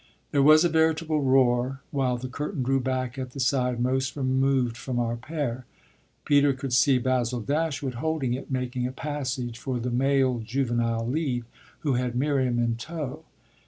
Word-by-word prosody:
There 140 - +3
was 155 +4 +7
a - - +3
veritable 160 -1 +2
roar 130 0 +2
while 130 -3 0
the 125 +2 -5
curtain 145 +3 -3
drew 135 +2 +2
back 130 0 -2
at 130 -1 -5
the 140 - -7
side 125 -1 +1
most 130 +1 0
removed 130 -3 +1
from 125 +1 -4
our 120 -1 0
pair. 130 -2 -4 0.6
Peter 145 -1 +4
could 135 -1 -5
see 135 +2 +5
Basil 125 -1 0
Dashwood 140 +1 -1
holding 160 -6 0
it, 130 - -5
making 125 -1 -2
a - - -5
passage 130 -4 -4
for 130 -1 -3
the 125 +1 -3
male 130 0 +2
"juvenile 115 -1 -1
lead," 130 -3 -1 0.4
who 145 -3 +1
had 125 -1 -1
Miriam 130 -2 +1
in 115 -1 +1
tow. 155 +2 -6
130 Hz, 165 wpm, -26 LUFS, 125-140 Hz, 0.6 s, was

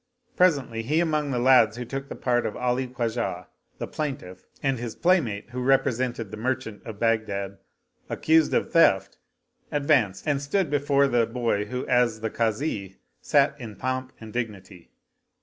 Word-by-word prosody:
Presently, 140 -11 +2
he 150 +8 +1
among 155 -3 0
the 130 - -1
lads 120 -3 +5
who 125 - -4
took 135 +3 -5
the - - -6
part 120 -1 0
of 105 - -6
Ali 125 +1 0
Khwajah 115 -7 -3 0.3
the - - -4
plain 150 -3 -3
tiff 90 -7 -13 0.2
and 135 -3 +1
his 120 -2 -5
playmate 125 - +1
who 125 +1 -4
represented 125 -4 +1
the 110 - -6
merchant 115 -2 -3
of 110 -3 -7
Baghdad 105 -4 -1 0.5
accused 160 -1 +3
of - - 0
theft, 100 - +3 0.5
advanced 140 -10 +2
and 140 -2 +1
stood 160 +3 0
before 140 -1 +3
the 120 -3 +2
boy 115 -3 -1
who 125 +4 -4
as 120 -3 +2
the 110 - -2
Kazi 110 -4 -2 0.2
sat 145 -1 +3
in 110 -3 -7
pomp 130 +2 -3
and 110 -1 -10
dignity. 100 -7 -6
125 Hz, 165 wpm, -25 LUFS, 110-140 Hz, 0.5 s, lads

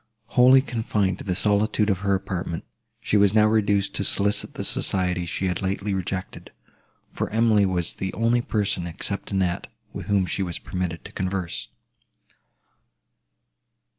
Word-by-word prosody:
Wholly 130 +2 +6
confined 105 -6 -1
to - - -7
the 90 -3 -1
solitude 105 +1 +2
of 95 - -1
her 100 0 +1
apartment, 90 -3 -4 0.4
she 105 - +2
was 100 0 +4
now 105 -1 +6
reduced 105 -2 +2
to - - -2
solicit 105 +1 0
the - - -4
society 90 -2 +1
she 95 - -2
had 90 -2 -1
lately 100 +1 -1
rejected; 95 0 -4 0.6
for - - -3
Emily 110 -2 +3
was 90 -2 0
the 95 0 -4
only 115 +1 +2
person, 100 -6 -1
except 85 +4 -5
Annette, 95 -3 -1 0.3
with - - -7
whom 100 -2 +2
she 95 - -2
was 90 -3 -3
permitted 90 -3 -4
to - - -9
converse. 95 -2 -3
100 Hz, 150 wpm, -24 LUFS, 90-105 Hz, 0.6 s, Wholly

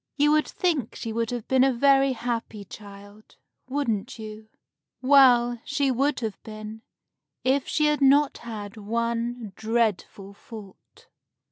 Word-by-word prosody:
You 295 +1 +4
would 305 0 +2
think 315 - -1
she 225 - -5
would 230 0 -1
have 240 -3 -5
been 260 -1 +3
a 270 - +4
very 270 +1 +3
happy 230 -3 -4
child, 205 +2 -13 0.3
wouldn't 240 -8 -2
you? 215 0 -10 0.5
Well, 250 -3 +5
she 280 -1 0
would 270 +2 0
have 220 -3 -5
been 215 0 -9 0.6
if 265 +1 +1
she 305 - +1
had 300 -1 +1
not 280 +1 +4
had 215 -2 -8
one 230 +2 -2
very 225 -5 -9
dreadful 215 -3 -2
fault. 205 -2 -14
235 Hz, 140 wpm, -25 LUFS, 215-270 Hz, 0.6 s, Well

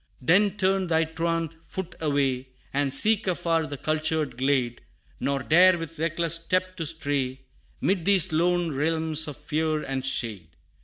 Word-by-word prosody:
Then 195 +9 +3
turn 190 -1 +1
thy 160 -1 +2
truant 165 0 -2
foot 185 0 -6
away, 135 -4 0 0.3
And 140 0 0
seek 210 - +3
afar 165 -3 0
the 145 - -6
cultured 155 -1 -1
glade, 130 -2 0 0.4
Nor 140 -1 -1
dare 180 +4 +6
with 165 -1 -8
reckless 165 0 0
step 185 +2 0
to 165 -3 -1
stray, 140 -4 -2 0.4
'Mid 185 -3 0
these 195 -6 +3
lone 175 +1 +2
realms 160 +1 0
of 150 - -7
fear 155 +1 -1
and 135 -1 -3
shade! 105 -11 -2
160 Hz, 150 wpm, -26 LUFS, 140-170 Hz, 0.4 s, dare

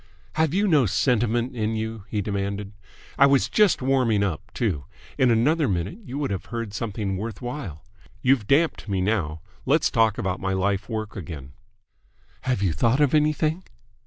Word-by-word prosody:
"Have 160 -1 +2
you 200 +4 +2
no 150 - +4
sentiment 120 +3 +1
in 110 -1 -1
you?" 110 -2 -4
he 105 -2 -1
demanded. 100 0 -3 0.5
"I 140 - +8
was 140 -1 +3
just 210 -10 +3
warming 125 -6 +2
up, 90 -7 -3
too! 85 - -1 0.3
In 130 - +3
another 140 +7 +3
minute 95 - -2
you 135 -5 -6
would 145 -5 -1
have 95 - -3
heard 115 -4 -5
something 105 -3 -3
worth 110 0 -5
while. 120 - -6 0.4
You've 125 -5 +3
damped 150 -5 +2
me 95 -1 0
now. 90 -6 -1 0.2
Let's - - +2
talk 110 -2 +3
about 95 -1 -2
my 95 0 -1
lifework 100 +3 -2
again." 75 -7 -7 0.9
"Have 125 -6 0
you 90 -5 +2
thought 115 - +2
of 145 -2 +3
anything?" 155 +3 +2
110 Hz, 165 wpm, -24 LUFS, 100-135 Hz, 0.9 s, I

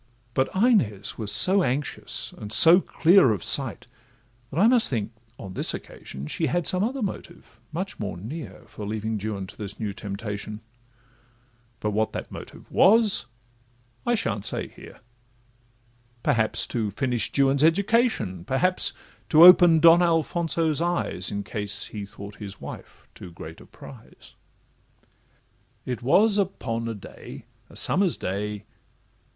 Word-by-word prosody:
But 130 +2 0
Inez 165 - +1
was 105 -2 -2
so 190 +2 +4
anxious, 140 -2 -3
and 105 - -9
so 165 +10 +8
clear 175 - +4
Of 100 - -5
sight, - - +3 0.6
that 145 - -4
I 210 - +5
must 240 -1 +4
think, 115 -4 -3 0.3
on 95 -1 -9
this - - -3
occasion, 70 +1 -10
She 160 - -2
had 175 -1 -1
some 185 +1 +3
other 250 +2 -2
motive 180 -3 -8
much 185 +5 -5
more 100 -5 -5
near 140 - -8
For 110 -1 -11
leaving 110 +1 -3
Juan 100 -2 -4
to - - -12
this 105 -1 -8
new 105 -3 -3
temptation; 105 +1 -6 1.2
But 105 - -2
what 110 +1 -1
that - - -6
motive - - -11
was, 210 - +4 0.8
I 240 - +1
sha'n't 110 - -2
say 105 - -3
here; - - -15 1.2
Perhaps 110 -2 +1
to 110 -3 -1
finish 125 +3 -1
Juan's 140 +1 +2
education, 195 - +1
Perhaps 180 - 0 0.4
to 160 0 +6
open 175 -2 +8
Don 165 +2 +6
Alfonso's 165 -2 0
eyes, 170 - -1
In 100 0 -4
case 105 -1 -3
he 105 -2 -8
thought 100 +1 -11
his 100 -2 -9
wife - - -11
too - - -11
great 80 -1 -11
a - - -16
prize. - - -15 1.5
It 125 -2 -4
was 205 - +3
upon 115 - -3
a 115 - -4
day, 100 - -12 0.2
a - - -16
summer's 185 -2 +2
day. 105 +2 -4
125 Hz, 145 wpm, -24 LUFS, -, 1.5 s, so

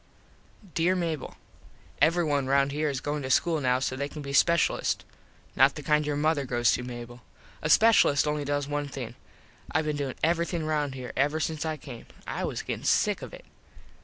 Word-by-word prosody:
_ 175 - -22
Dere 175 +3 +2
Mable: 165 -5 -3 0.6
Everyone 155 -5 +2
round 140 +1 +3
here 150 +1 0
is 135 -1 -3
goin 145 0 -2
to 130 - -5
school 160 +3 +2
now 125 -1 +2
so 130 0 -2
they 140 +2 -3
can 150 -1 -8
be 140 - -5
speshulists. 170 +4 +2 0.5
Not 135 +2 +5
the 150 - -7
kind 150 +1 +2
your 145 - 0
mother 150 0 +1
goes 120 -4 +2
to, - - 0
Mable. 120 0 -8 0.4
A - - -1
speshulist 215 -6 +5
only 150 0 -1
does 145 0 -1
one 145 0 -2
thing. 125 -4 -6 0.6
I - - +1
been 150 -1 -2
doin 140 -2 -3
everything 170 0 +1
round 150 -3 -1
here 125 -1 -7
ever 145 +4 +1
since 160 -1 -2
I 155 -1 -2
came. 130 -5 -10 0.2
I - - -4
was - - -4
gettin - - -4
sick - - +2
of - - -8
it. - - -12
145 Hz, 195 wpm, -27 LUFS, 135-155 Hz, 0.6 s, Not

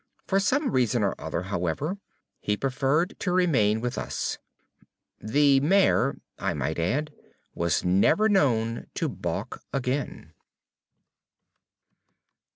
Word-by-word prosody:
For 195 - +2
some 270 +9 +1
reason 125 -3 +1
or 100 - +1
other, 85 - -3
however, 100 - -2 0.4
he 105 0 -1
preferred 135 - 0
to 180 - -1
remain 125 - +2
with 125 0 -2
us. - - -3 0.8
The 140 +4 +3
mare, 190 +8 +3 0.2
I - - -1
might - - -2
add, 145 - -1 0.4
was 85 -1 0
never 100 - +4
known 120 - +1
to - - -1
balk - - -4
again. 135 +1 -3
135 Hz, 110 wpm, -26 LUFS, 105-170 Hz, 0.8 s, never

